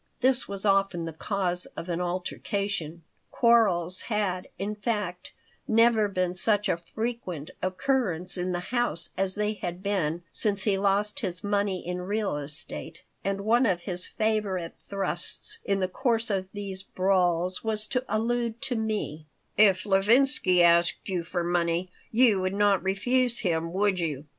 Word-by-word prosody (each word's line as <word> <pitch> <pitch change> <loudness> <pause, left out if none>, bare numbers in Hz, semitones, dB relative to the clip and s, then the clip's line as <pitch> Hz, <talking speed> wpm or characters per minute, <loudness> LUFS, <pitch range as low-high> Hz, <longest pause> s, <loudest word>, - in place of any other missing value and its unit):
This 260 0 +2
was 200 0 -5
often 195 -4 +2
the 165 - -5
cause 180 +1 -1
of 165 - -5
an 175 0 -2
altercation. 180 -1 -3 0.3
Quarrels 190 -7 +4
had, 200 -4 -1
in 205 +2 -3
fact, 210 -4 -3 0.4
never 225 -1 +4
been 185 -2 -1
such 205 +2 +3
a 175 - +1
frequent 180 -4 -5
occurrence 185 -2 0
in 180 0 -1
the 175 +3 -4
house 240 -10 +2
as 190 0 0
they 210 0 0
had 180 -2 -6
been 175 -5 -1
since 200 -3 +1
he 205 -3 +2
lost 200 +2 +1
his 180 -4 -4
money 200 -2 -1
in 180 +1 -3
real 200 -1 -1
estate, 150 +2 -2 0.2
and 195 0 -1
one 235 +4 +3
of 180 -4 0
his 180 -1 -5
favorite 210 -6 -1
thrusts 195 -3 -4
in 195 -1 0
the 185 - +1
course 230 +3 0
of 190 -1 -1
these 200 -2 -6
brawls 185 -2 0
was 215 -1 +1
to 250 +2 -1
allude 230 +2 -1
to 250 - -1
me 215 -9 -3 0.3
"If 200 -3 +5
Levinsky 205 -2 +4
asked 170 +3 +3
you 180 -2 -1
for 175 +1 -3
money 175 +1 0 0.2
you 225 -4 +4
would 185 +1 -1
not 205 -2 +3
refuse 235 +6 +1
him, 165 -3 -1
would 195 0 +1
you?" 150 -4 -3
195 Hz, 155 wpm, -27 LUFS, 175-215 Hz, 0.4 s, If